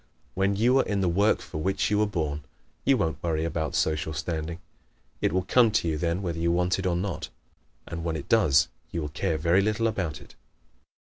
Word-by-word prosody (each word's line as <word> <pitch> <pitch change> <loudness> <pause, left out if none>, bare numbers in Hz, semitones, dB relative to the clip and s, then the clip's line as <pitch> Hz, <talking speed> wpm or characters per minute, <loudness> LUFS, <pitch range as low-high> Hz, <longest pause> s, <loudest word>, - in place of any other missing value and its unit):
When 100 +1 +1
you 120 +6 +4
are - - +4
in 100 -2 -1
the 95 - +2
work 100 +5 +2
for 75 - -6
which 95 +5 0
you 105 - +3
were 105 - +3
born 75 -7 -2 0.4
you 135 - +4
won't 80 -6 -1
worry 80 -1 0
about 80 -1 -2
social 80 0 0
standing. 80 +1 -3 0.6
It - - +2
will 95 +2 +1
come 120 +4 +4
to 105 -5 +1
you 80 - 0
then 85 +5 -1
whether 85 -2 -3
you 85 +1 +1
want 90 +2 +1
it 95 - -1
or 90 - +1
not. 90 -3 -3 0.6
And 85 -1 -5
when 85 -1 -1
it 75 - -6
does 85 -12 +4 0.2
you 85 - -3
will 75 - -4
care 80 +2 -1
very 85 +5 +3
little 110 +3 0
about 95 -8 -1
it. - - -16
85 Hz, 215 wpm, -27 LUFS, 80-100 Hz, 0.6 s, you